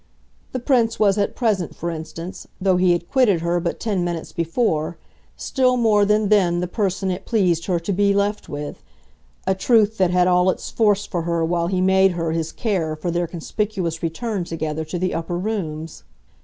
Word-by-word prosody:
The - - -2
Prince 245 -2 +1
was 205 -1 +3
at 200 - 0
present, 210 -8 0
for 170 +1 -3
instance, 165 +2 -7
though 190 -1 +2
he 180 0 +4
had 175 0 -2
quitted 215 -11 +3
her 170 +1 +1
but 170 0 -3
ten 200 -6 -1
minutes 170 -2 -4
before, 165 -2 -1 0.4
still 255 -2 +1
more 215 -4 +4
than 210 0 +2
then 180 -5 +3
the 180 - -1
person 190 -1 -1
it 185 +2 -4
pleased 180 -7 +1
her 180 -3 +1
to 195 +4 -2
be 200 +2 +3
left 200 +1 0
with 145 0 -6 0.6
a 190 - +2
truth 215 +2 +2
that 185 -2 +4
had 180 0 +3
all 180 0 +4
its - - -3
force 205 -2 +2
for 175 -5 -3
her 170 0 0
while 170 0 0
he 185 0 0
made 190 0 +4
her 165 -2 -2
his 160 -1 -2
care 175 -9 -1
for 165 +3 -3
their 175 0 0
conspicuous 175 0 -3
return 195 +4 -2
together 160 -2 -3
to 165 +3 -4
the 185 +1 -1
upper 170 +1 -3
rooms. 165 -6 -4
180 Hz, 195 wpm, -22 LUFS, 170-205 Hz, 0.6 s, he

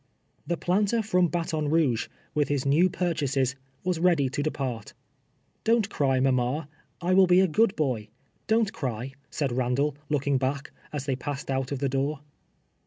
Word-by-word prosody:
The 170 - 0
planter 205 +6 +1
from 180 -4 +3
Baton 160 -3 -1
Kouge, 145 -7 +2 0.3
with 150 -1 +1
his 140 -2 -1
new 160 +7 +4
pur 175 -1 -1
chases, 135 -4 0 0.3
was 180 -2 0
ready 165 -6 +3
to 140 - -2
depart. 130 -7 -3 0.3
" - - -43
Don't 225 -2 +2
cry, 135 -2 +2
mama. 130 +3 +1 0.3
I 180 +2 +1
will 190 0 +6
be 180 +1 +6
a 190 - +5
good 215 +5 +2
boy. 125 -8 -1 0.4
Don't 220 -2 +2
cry," 125 -1 -4 0.2
said 140 -4 -1
Ilandall, 130 +4 +1 0.2
looking 140 -2 +1
back, 135 +2 -2 0.2
as 145 -2 -4
they 135 -2 0
passed 140 +1 -5
out 135 0 -1
of 140 - -1
the 140 +1 0
door. 140 +2 -1
145 Hz, 175 wpm, -27 LUFS, 135-175 Hz, 0.4 s, will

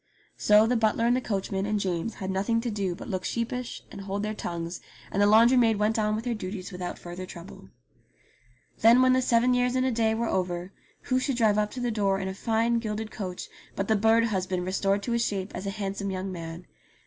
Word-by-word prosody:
So 210 +1 +5
the 245 +2 +1
butler 225 0 +2
and 240 +1 +4
the 255 - 0
coachman 195 -3 -2
and 210 0 0
James 185 +2 -2
had 190 0 -4
nothing 200 +5 +1
to 240 -1 -3
do 195 -4 -2
but - - -9
look 185 -1 -3
sheepish 235 +3 -3
and - - -8
hold 200 +1 -3
their 215 0 -2
tongues, 170 -3 -5 0.3
and 200 - 0
the 205 - +5
laundry 230 +4 +6
maid 225 -3 +4
went 215 +2 +1
on 215 0 +1
with 220 +2 -4
her 245 - 0
duties 185 -3 -6
without 180 -1 -5
further 180 +1 -8
trouble. 170 - -11 1.1
Then 235 +3 +6
when 255 0 +5
the 260 - +3
seven 250 0 +3
years 250 0 +1
and 255 0 +2
a 260 - +1
day 220 -1 +1
were 230 +1 -1
over 180 -1 -2 0.3
who 255 0 0
should 255 -1 -1
drive 215 -3 +3
up 210 0 +1
to 255 - -5
the 245 -1 -1
door 200 -3 +1
in 190 - -3
a 190 - -3
fine 230 +3 +1
gilded 215 -1 -4
coach 185 -3 -5 0.3
but 195 - -2
the 220 - +3
bird 225 +2 +4
husband 185 -4 -1
restored 195 +2 0
to 240 - -3
his 235 0 +1
shape 195 -2 -2
as 190 +2 -5
a - - 0
handsome 200 -1 -3
young 190 0 -3
man. 165 0 -7
210 Hz, 230 wpm, -27 LUFS, 190-230 Hz, 1.1 s, laundry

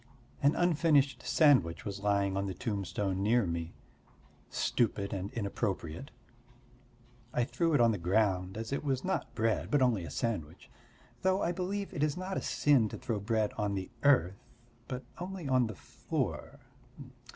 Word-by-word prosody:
An 140 +2 +4
unfinished 150 -6 +3
sandwich 135 - +3
was 100 -1 -4
lying 100 -1 +1
on 100 0 -1
the 95 - -4
tombstone 100 -2 -2
near 110 +2 +3
me; 85 -1 -4 0.7
stupid 105 -4 0
and 100 +1 -4
inappropriate. 100 - -3 1.3
I 125 - +3
threw 165 +5 +1
it 125 - +4
on 115 -1 +5
the 105 - -2
ground, 95 +1 +1
as 115 +4 -4
it 140 - -2
was 135 -3 -1
not 190 +1 -2
bread 110 -1 0
but 145 - +3
only 115 -8 +2
a 85 - -6
sandwich. 85 -3 -4 0.5
Though 190 +1 +2
I 170 - +1
believe 190 +3 -3
it 145 - -3
is 150 0 +1
not 185 +1 -4
a - - -1
sin 135 -7 +3
to - - -6
throw 115 -4 -3
bread 110 0 0
on 105 -1 0
the 95 -1 -4
earth, 100 - +3 0.5
but 125 0 -5 0.2
only 180 -3 -5
on 130 -3 +3
the 110 - -6
floor. - - -4
115 Hz, 160 wpm, -31 LUFS, 100-145 Hz, 1.3 s, on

